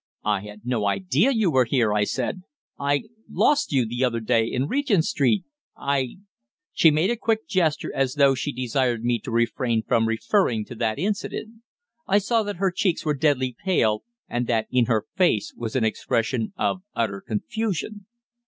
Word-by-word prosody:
"I 105 -2 +2
had 105 +1 -11
no 120 -5 0
idea 100 - +2
you 220 -9 +2
were 130 -3 +4
here," 115 -3 +2
I 105 -1 +2
said. 130 - -3 0.4
"I 140 0 +1 0.3
lost 295 0 +2
you 130 -4 +2
the 120 +3 -2
other 120 -2 +1
day 115 0 +2
in 130 +3 -1
Regent 235 - +1
Street 140 - +1 0.3
I 135 -3 -1 0.3
" 365 +8 -62
She 165 - +6
made 155 +7 +2
a - - +1
quick 220 -1 -1
gesture, 175 -7 0
as 135 0 0
though 140 -2 +5
she 135 +2 -2
desired 125 -2 -1
me 120 -1 +1
to 135 - -8
refrain 115 0 0
from 115 0 +2
referring 115 - +1
to - - -9
that 110 -2 0
incident. 215 +5 -3 0.5
I 200 - +4
saw 225 +3 +2
that 205 -1 -4
her 190 +1 +1
cheeks 180 -2 0
were 150 - +2
deadly 130 -4 +1
pale, 110 - +2 0.3
and 120 0 -2
that 115 -2 +1
in 125 -2 +3
her 110 -3 0
face 175 - +2
was 115 0 -5
an 130 - +2
expression 115 - -1
of 185 - 0
utter 110 -4 -1
confusion. 205 - -3
130 Hz, 180 wpm, -24 LUFS, 115-185 Hz, 0.5 s, She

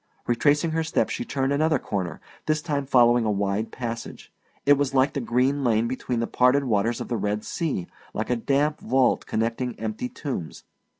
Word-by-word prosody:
Retracing 145 +6 +2
her 160 0 0
steps 160 - 0
she 245 - -3
turned 135 - -1
another 155 +1 +2
corner, 95 -9 -4 0.3
this 155 0 +2
time 145 -4 -2
following 120 -2 +5
a 110 - 0
wide 100 +1 -1
passage. 115 -2 -6 0.3
It 145 - +7
was 140 -1 0
like 135 +1 +3
the 140 - -2
green 130 +4 +1
lane 115 -2 +2
between 125 -1 -2
the - - +1
parted 125 +4 +3
water 110 -4 +1
of 120 - -4
the 120 - -1
Red 105 0 -2
Sea, 155 - -2 0.3
like 110 +3 -3
a - - +3
damp 140 +5 +1
vault 130 -1 +2
connecting 115 +2 -2
empty 110 +3 -3
tombs. 125 - -5
125 Hz, 185 wpm, -25 LUFS, 115-140 Hz, 0.3 s, It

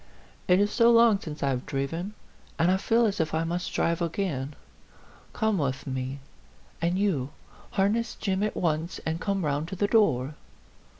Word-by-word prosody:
It 180 +1 +5
is 205 +1 +2
so 230 +1 +5
long 230 -3 +6
since 155 -6 -7
I 140 - +2
have 125 -2 -2
driven, 165 +9 -3 0.4
and 170 +2 +3
I 190 - +3
feel 230 +4 +2
as 205 -2 -1
if 160 -1 0
I 160 - +1
must 175 +2 -2
drive 170 +1 0
again. 160 -5 -2 0.8
Come 220 -4 0
with 140 -2 -2
me. 130 +1 -4 0.6
And 170 +2 +1
you, 175 -10 0 0.4
harness 210 +4 +1
Jim 190 -2 -1
at 210 0 -1
once 160 0 -1
and 160 +1 -2
come 195 -4 -1
round 145 +2 -1
to 190 - -5
the 205 - +1
door." 155 - +2
175 Hz, 175 wpm, -27 LUFS, 150-200 Hz, 0.8 s, long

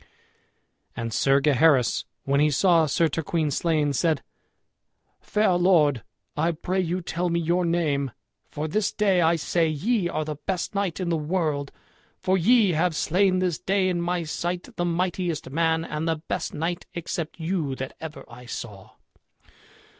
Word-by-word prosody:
And 115 -1 -4
Sir 135 +3 +3
Gaheris, 140 -3 +3 0.2
when 140 +1 +1
he 150 +1 +4
saw 165 +2 +4
Sir 165 +4 +2
Turquine 160 0 -1
slain, 150 -1 +1
said, 155 +2 +1 1.0
"Fair 210 -2 +1
lord, 165 - +3 0.3
I 165 +3 +1
pray 180 +4 -2
you 180 0 -1
tell 175 +1 -2
me 170 0 +1
your 175 +2 +1
name, 155 -5 0 0.4
for 150 +2 -4
this 210 +6 0
day 195 -4 +2
I 165 0 +4
say 165 +2 +1
ye 185 +5 0
are 155 -1 -2
the 150 -1 -5
best 185 0 -2
knight 200 -4 -1
in 180 -2 -2
the 165 - +1
world, 150 -3 -1 0.5
for 185 - +1
ye 205 +2 +4
have 165 +1 +1
slain 185 +4 +2
this 180 -3 0
day 190 -1 +1
in 175 -1 -1
my 175 0 -1
sight 175 +3 -4
the 175 - -1
mightiest 175 -4 -2
man 160 +1 +1
and 155 +1 -3
the 165 - +2
best 155 +1 -4
knight 170 +3 -3
except 170 -1 -4
you 160 -5 -1
that 130 0 -6
ever 160 -1 -8
I 120 +1 -13
saw." 105 -5 -8
165 Hz, 160 wpm, -25 LUFS, 150-180 Hz, 1.0 s, he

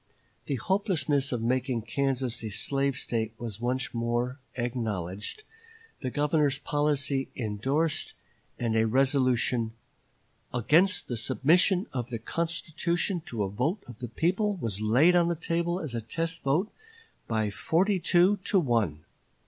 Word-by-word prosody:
The 140 - 0
hopelessness 145 - +1
of 120 -3 -2
making 125 -1 0
Kansas 130 0 -1
a 110 - -3
slave 140 +5 0
State 110 -3 -2
was 115 -2 -6
once 130 +2 -1
more 120 +3 -1 0.2
acknowledged, 110 - -3 0.6
the 130 - -2
Governor's 145 0 +1
policy 145 -2 0
indorsed, 135 +8 -1 0.4
and 115 -2 -1
a 110 0 +3
resolution 130 -2 +2 0.8
"against 160 - +3
the 120 - -3
submission 160 - +3
of 120 -2 -3
the 120 - -3
constitution 170 - -2
to 110 -4 -2
a 95 - -2
vote 150 - -1
of 120 -2 -12
the 120 -2 -5
people 190 - +1
was 110 - -3
laid 130 +12 +5
on 170 -1 +4
the 170 - 0
table 170 +2 -1
as 155 -8 -4
a 115 - -2
test 165 +9 -2
vote 155 +10 +1 0.6
by 110 -2 0
forty 185 - +1
two 180 +4 +4
to 195 - +3
one." 110 - 0
135 Hz, 140 wpm, -28 LUFS, 115-165 Hz, 0.8 s, laid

